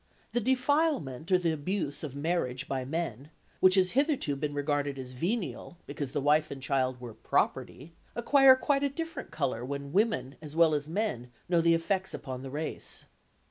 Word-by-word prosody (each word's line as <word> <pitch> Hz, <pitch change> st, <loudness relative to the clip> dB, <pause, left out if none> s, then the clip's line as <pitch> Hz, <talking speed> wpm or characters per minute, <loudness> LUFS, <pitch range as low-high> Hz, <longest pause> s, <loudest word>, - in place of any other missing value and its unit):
The 240 Hz, -, 0 dB
defilement 255 Hz, -, +1 dB
or 185 Hz, -, +7 dB
the 175 Hz, -2 st, 0 dB
abuse 155 Hz, -1 st, -2 dB
of 140 Hz, -3 st, -5 dB
marriage 140 Hz, -4 st, -1 dB
by 130 Hz, -1 st, -2 dB
men, 145 Hz, -2 st, -4 dB, 0.3 s
which 185 Hz, 0 st, +6 dB
has 185 Hz, -1 st, +4 dB
hitherto 275 Hz, -, +1 dB
been 145 Hz, +1 st, -3 dB
regarded 145 Hz, -1 st, -1 dB
as 130 Hz, -1 st, -7 dB
venial, 175 Hz, -, -3 dB
because 140 Hz, -2 st, -5 dB
the -, -, -1 dB
wife 150 Hz, +2 st, +3 dB
and 140 Hz, -, -6 dB
child 130 Hz, -1 st, 0 dB
were 120 Hz, -2 st, -8 dB
property, 145 Hz, +7 st, -1 dB, 0.2 s
acquire 265 Hz, +2 st, +6 dB
quite 275 Hz, +1 st, +1 dB
a 280 Hz, -, +2 dB
different 325 Hz, -1 st, -5 dB
colour 120 Hz, -2 st, -2 dB
when 140 Hz, +2 st, -5 dB
women 205 Hz, -, +1 dB
as 150 Hz, -1 st, -8 dB
well 165 Hz, -1 st, +5 dB
as 150 Hz, 0 st, -2 dB
men 165 Hz, -, -2 dB, 0.2 s
know 170 Hz, -1 st, +3 dB
the 165 Hz, 0 st, +4 dB
effects 190 Hz, +3 st, -1 dB
upon 130 Hz, -3 st, -6 dB
the 135 Hz, -, -7 dB
race. 150 Hz, +4 st, -4 dB
155 Hz, 180 wpm, -30 LUFS, 140-200 Hz, 0.3 s, or